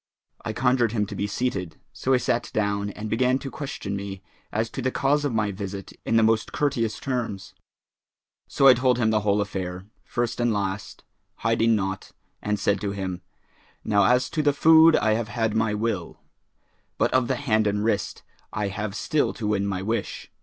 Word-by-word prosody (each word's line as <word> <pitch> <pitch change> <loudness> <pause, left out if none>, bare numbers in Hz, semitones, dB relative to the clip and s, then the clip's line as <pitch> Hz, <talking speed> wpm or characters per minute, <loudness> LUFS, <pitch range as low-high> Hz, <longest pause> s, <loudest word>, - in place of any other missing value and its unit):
I - - -3
conjured 120 -1 +2
him 105 -3 +1
to - - -7
be 100 - -2
seated; 100 -8 -3
so 130 - -2
he 130 - +6
sat 120 -1 -1
down 100 -1 0
and 105 +2 -6
began 125 +4 +2
to 135 -1 -7
question 135 -8 -5
me 100 -1 -6 0.3
as 110 +1 0
to - - -5
the 130 - +1
cause 145 +3 +1
of 145 - 0
my 110 -2 0
visit 100 0 -6
in - - +2
the 115 - +5
most 110 0 +2
courteous 125 -7 -1
terms. 120 -7 -4 0.9
So 135 - +1
I 130 - +10
told 125 0 +2
him 110 -2 +2
the 110 - +3
whole 105 0 +1
affair, 95 -2 -4 0.2
first 120 -1 -2
and 120 -1 +2
last, 100 -1 -3 0.3
hiding 115 0 +2
naught, 95 -2 -3 0.3
and 105 0 -1
said 100 0 +1
to 100 -2 -2
him, 95 -2 -4 0.6
'Now 100 -2 +3
as 125 +4 +3
to 160 - 0
the 145 -1 +3
food 160 +2 +7
I 110 - +2
have 110 0 -1
had 110 -2 -1
my 110 -1 +1
will, 105 -5 -3 0.8
but - - +1
of 130 -2 +3
the 130 - 0
hand 110 -5 +1
and 105 0 0
wrist 105 -2 -1 0.3
I 105 -2 -2
have 100 +1 -4
still 155 -2 0
to 115 - -5
win 100 -1 0
my 95 -1 -2
wish.' 110 +3 -3
110 Hz, 195 wpm, -25 LUFS, 100-125 Hz, 0.9 s, I